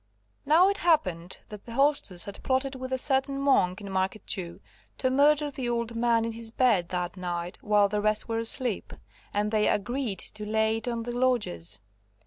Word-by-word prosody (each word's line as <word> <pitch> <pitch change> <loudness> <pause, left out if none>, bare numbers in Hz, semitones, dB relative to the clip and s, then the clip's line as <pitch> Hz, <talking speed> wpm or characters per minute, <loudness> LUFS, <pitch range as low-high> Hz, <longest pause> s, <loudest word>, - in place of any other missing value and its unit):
Now 330 +5 +6
it 400 0 0
happened 185 - +1
that 210 -1 -10
the 230 - -8
hostess 275 - +1
had 200 - -7
plotted 265 +1 0
with 260 0 -6
a 260 - +1
certain 275 +1 +1
monk 215 -9 +2
in 200 -1 -7
Market 190 +2 -2
Jew 170 -3 -2 0.4
to 260 - +1
murder 290 +2 +3
the 260 -3 -4
old 235 -1 -2
man 230 -1 +2
in 230 - -2
his 225 0 -6
bed 225 -7 +2
that 180 0 -3
night 175 -1 -4
while 210 -1 +3
the 210 +1 -1
rest 215 0 +2
were 225 -1 -1
asleep, 230 -1 -2 0.4
and 210 +1 -1
they 215 -1 +2
agreed 240 0 -1
to 215 +3 -2
lay 220 +1 +1
it 225 - -7
on 235 -1 -2
the 240 +1 -5
lodgers. 210 - 0
225 Hz, 190 wpm, -27 LUFS, 200-260 Hz, 0.4 s, Now